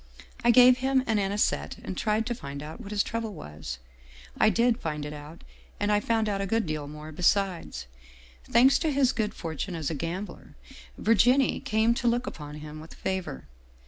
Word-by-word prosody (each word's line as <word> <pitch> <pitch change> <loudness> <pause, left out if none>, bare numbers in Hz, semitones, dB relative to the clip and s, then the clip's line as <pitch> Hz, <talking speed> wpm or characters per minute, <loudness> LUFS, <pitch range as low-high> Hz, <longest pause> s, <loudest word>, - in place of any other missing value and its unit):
I 240 - +4
gave 250 +1 +7
him 265 0 +2
an 220 -3 +1
anisette 200 +1 0
and 190 - -5
tried 215 +3 0
to 240 - -1
find 140 - -7
out 155 +10 -8
what 200 - -9
his 210 0 +1
trouble 225 -3 -4
was. 75 -3 -7 0.6
I - - +4
did 235 +2 +2
find 150 -2 -3
it 150 - -6
out, 150 +3 -10 0.4
and 205 0 +1
I 205 - +4
found 225 0 0
out 200 -1 -1
a 195 - -1
good 225 +2 +1
deal 155 -2 -3
more 150 +1 -9
besides. 175 - 0 0.3
" 60 +1 -24
Thanks 255 +4 +6
to 320 - 0
his 270 -2 +3
good 215 -2 -2
fortune 165 +2 -4
as 160 -1 -2
a - - -2
gambler, 170 +7 -6 0.4
Virginie 245 +5 +3
came 220 +2 +2
to 240 0 -1
look 240 +1 +2
upon 150 - -7
him 150 0 -8
with 160 +1 -12
favor. 190 - -4
200 Hz, 195 wpm, -27 LUFS, 155-230 Hz, 0.6 s, gave